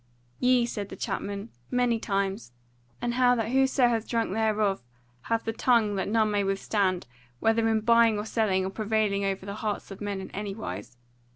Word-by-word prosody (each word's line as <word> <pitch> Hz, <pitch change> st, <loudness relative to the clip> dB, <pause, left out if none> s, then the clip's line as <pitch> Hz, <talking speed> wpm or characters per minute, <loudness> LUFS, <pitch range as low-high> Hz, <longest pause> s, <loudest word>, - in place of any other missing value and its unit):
"Yea," 250 Hz, -1 st, +4 dB
said 205 Hz, -4 st, -5 dB
the -, -, -7 dB
chapman, 200 Hz, +2 st, -4 dB, 0.2 s
"many 245 Hz, -2 st, +1 dB
times; 195 Hz, -, -2 dB, 0.5 s
and 240 Hz, 0 st, 0 dB
how 250 Hz, 0 st, +4 dB
that 225 Hz, -2 st, -1 dB
whoso 265 Hz, -1 st, +4 dB
hath 230 Hz, -2 st, 0 dB
drunk 230 Hz, -5 st, 0 dB
thereof 215 Hz, -2 st, +1 dB, 0.5 s
hath 230 Hz, 0 st, +1 dB
the 225 Hz, -, -2 dB
tongue 230 Hz, -3 st, +3 dB
that 190 Hz, -, -1 dB
none 215 Hz, -1 st, +2 dB
may 205 Hz, -1 st, +1 dB
withstand, 195 Hz, -1 st, 0 dB, 0.3 s
whether 225 Hz, +4 st, +2 dB
in 220 Hz, -1 st, +2 dB
buying 230 Hz, -1 st, +4 dB
or 210 Hz, -, -3 dB
selling, 205 Hz, -4 st, +1 dB
or 190 Hz, -, -3 dB
prevailing 210 Hz, -1 st, 0 dB
over 195 Hz, -1 st, -2 dB
the 200 Hz, -, -5 dB
hearts 210 Hz, -2 st, -3 dB
of 195 Hz, -, -9 dB
men 205 Hz, -1 st, -3 dB
in 190 Hz, -, -8 dB
any 200 Hz, -1 st, -4 dB
wise. 105 Hz, -, -7 dB
215 Hz, 185 wpm, -27 LUFS, 200-230 Hz, 0.5 s, Yea